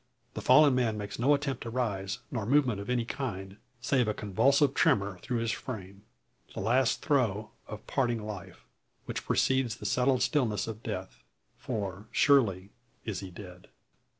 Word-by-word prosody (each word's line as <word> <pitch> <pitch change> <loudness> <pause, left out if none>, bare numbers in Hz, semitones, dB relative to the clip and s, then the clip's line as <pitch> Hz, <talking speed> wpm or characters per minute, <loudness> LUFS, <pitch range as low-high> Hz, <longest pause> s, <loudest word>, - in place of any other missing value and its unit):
The - - -5
fallen 140 +2 +6
man 120 -4 +1
makes 105 0 -6
no 140 +5 +4
attempt 140 -3 -3
to 115 - -5
rise, 105 -6 -2
nor 110 -5 -3
movement 130 -5 +3
of 100 - -8
any 120 -2 +1
kind, 100 -7 -5 0.2
save 125 -1 +2
a 105 - 0
convulsive 135 +7 +2
tremor 100 -7 +2
through 120 +6 -3
his 115 -1 0
frame; 100 -6 -7 0.5
the - - -4
last 120 +5 +2
throe 110 -8 +1 0.2
of 105 0 -8
parting 120 -5 -1
life, 100 -3 -8 0.4
which - - -5
precedes 130 -3 +1
the - - -11
settled 125 0 +2
stillness 120 - +1
of 110 -1 -7
death. 95 - -6 0.4
For 100 -1 -4
surely 100 -9 +3 0.3
is 110 -4 -3
he 95 - -7
dead. 90 -1 -11
110 Hz, 160 wpm, -29 LUFS, 100-130 Hz, 0.5 s, fallen